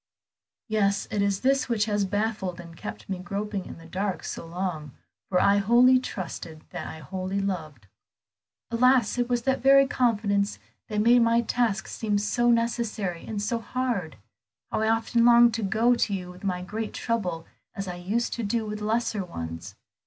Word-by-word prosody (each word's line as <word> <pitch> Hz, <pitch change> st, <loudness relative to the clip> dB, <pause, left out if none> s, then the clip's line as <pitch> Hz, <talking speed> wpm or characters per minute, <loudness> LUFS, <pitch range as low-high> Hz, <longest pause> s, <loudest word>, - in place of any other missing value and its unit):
"Yes, 200 Hz, -3 st, +1 dB
it 210 Hz, -2 st, 0 dB
is 200 Hz, -1 st, 0 dB
this 270 Hz, +1 st, +2 dB
which 220 Hz, -3 st, +2 dB
has 205 Hz, -2 st, 0 dB
baffled 205 Hz, -3 st, -2 dB
and 170 Hz, -1 st, -10 dB
kept 105 Hz, -7 st, -8 dB
me 190 Hz, -2 st, -3 dB
groping 200 Hz, +1 st, -4 dB
in -, -, -9 dB
the 165 Hz, -, -14 dB
dark 190 Hz, +3 st, -3 dB
so 165 Hz, -, -6 dB
long, 165 Hz, -5 st, -4 dB, 0.4 s
for 180 Hz, -, +3 dB
I 200 Hz, 0 st, +4 dB
wholly 245 Hz, +5 st, +5 dB
trusted 165 Hz, -8 st, -6 dB
what -, -, -5 dB
I -, -, -7 dB
wholly 185 Hz, +6 st, -4 dB
loved." 160 Hz, -, -4 dB, 0.9 s
"Alas, 245 Hz, 0 st, +3 dB
it 245 Hz, 0 st, 0 dB
was 240 Hz, -1 st, 0 dB
that 265 Hz, -1 st, +1 dB
very 275 Hz, +1 st, +7 dB
confidence 210 Hz, -6 st, +1 dB, 0.3 s
that 210 Hz, -1 st, -1 dB
made 240 Hz, +3 st, +6 dB
my 230 Hz, 0 st, +4 dB
task 230 Hz, -4 st, 0 dB
seem 210 Hz, -2 st, -1 dB
so 240 Hz, +4 st, +1 dB
necessary 230 Hz, -6 st, 0 dB
and 215 Hz, -2 st, -3 dB
so 225 Hz, +3 st, -1 dB
hard. 230 Hz, -, -2 dB, 0.6 s
How -, -, 0 dB
often 225 Hz, +1 st, +2 dB
I -, -, +8 dB
longed 235 Hz, -1 st, +6 dB
to 230 Hz, -, -2 dB
go 220 Hz, +5 st, +3 dB
to 225 Hz, -3 st, 0 dB
you 180 Hz, -1 st, -6 dB
with 180 Hz, +2 st, -14 dB
my 180 Hz, -2 st, -2 dB
great 215 Hz, +3 st, -4 dB
trouble 180 Hz, -8 st, -2 dB, 0.3 s
as 195 Hz, 0 st, -4 dB
I 180 Hz, -1 st, -5 dB
used 210 Hz, +7 st, -1 dB
to 235 Hz, -, -3 dB
do 220 Hz, +2 st, -1 dB
with 210 Hz, 0 st, -5 dB
lesser 215 Hz, -1 st, 0 dB
ones. 85 Hz, -, -7 dB
210 Hz, 180 wpm, -26 LUFS, 185-235 Hz, 0.9 s, I